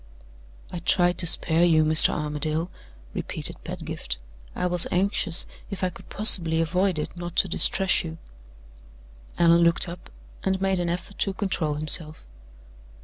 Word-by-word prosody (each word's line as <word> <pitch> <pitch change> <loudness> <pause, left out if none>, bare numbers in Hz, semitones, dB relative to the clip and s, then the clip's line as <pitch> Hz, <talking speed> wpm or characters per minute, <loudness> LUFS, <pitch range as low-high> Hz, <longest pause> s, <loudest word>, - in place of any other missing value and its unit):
"I 180 - -6
tried 175 0 +1
to 170 - +3
spare 165 0 +2
you, 160 -3 +3
Mr. 155 0 +8
Armadale," 150 +3 -4 0.4
repeated - - -2
Pedgift. - - -7 0.4
"I - - -3
was 180 -1 +4
anxious, 185 -2 -1 0.2
if 195 -2 -7
I 185 - -1
could - - -16
possibly 170 -6 +3
avoid 180 +2 -1
it, 150 - -6
not 175 -1 -8
to - - +3
distress 190 +1 +2
you." 160 -1 -8 1.2
Allan 170 0 +4
looked 170 +1 +2
up, 170 +1 -11 0.3
and 190 0 -1
made 195 -1 -1
an 175 -1 -2
effort 180 +3 -7
to 195 -2 -1
control 175 -7 -2
himself. 155 +1 +1
175 Hz, 145 wpm, -24 LUFS, 160-185 Hz, 1.2 s, Mr